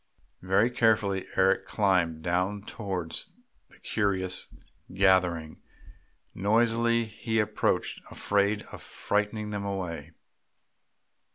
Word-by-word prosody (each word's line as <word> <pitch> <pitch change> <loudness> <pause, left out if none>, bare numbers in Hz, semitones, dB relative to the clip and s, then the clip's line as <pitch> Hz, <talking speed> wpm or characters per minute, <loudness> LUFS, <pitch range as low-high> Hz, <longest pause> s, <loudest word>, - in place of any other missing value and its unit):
Very 95 +6 +3
carefully 110 -5 +2
Eric 95 0 +3
climbed 90 -6 +1
down 90 +3 0
towards 95 -7 -4 0.4
that - - -21
curious 95 -4 0 0.4
gathering. 90 -4 +2 0.7
Noiselessly 115 +3 +2
he 110 +1 -2
approached, 105 - 0
afraid 100 +1 +1
of - - -9
frightening 105 +1 -2
them 100 -1 -3
away. 85 -6 -4
100 Hz, 90 wpm, -28 LUFS, 90-105 Hz, 0.7 s, Very